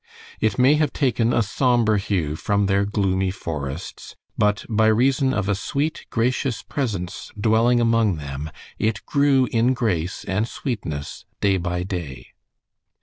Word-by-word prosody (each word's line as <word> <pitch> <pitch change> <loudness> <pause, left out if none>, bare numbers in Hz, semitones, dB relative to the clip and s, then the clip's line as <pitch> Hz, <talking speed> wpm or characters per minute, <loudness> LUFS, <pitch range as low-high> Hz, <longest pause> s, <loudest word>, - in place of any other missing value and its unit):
It 110 -3 +1
may 130 +3 +5
have 150 - +1
taken 120 -4 +1
a 115 - +2
somber 115 0 +2
hue 95 -7 -1
from 100 +5 0
their 100 +1 +2
gloomy 95 -2 0
forests, 75 -4 -6 0.2
but 105 0 +1
by 110 -1 +2
reason 130 +4 +3
of 105 -6 -1
a 100 - +2
sweet, 140 +9 -2
gracious 125 +1 0
presence 100 -10 -4
dwelling 115 +3 +3
among 115 -4 +2
them 70 0 -6 0.3
it 110 -2 -1
grew 140 -2 +3
in 120 +3 +2
grace 90 -8 -1
and 105 +4 0
sweetness 85 - -5
day 100 -2 +2
by 90 0 -2
day. 85 -8 -6
105 Hz, 145 wpm, -22 LUFS, 95-120 Hz, 0.3 s, may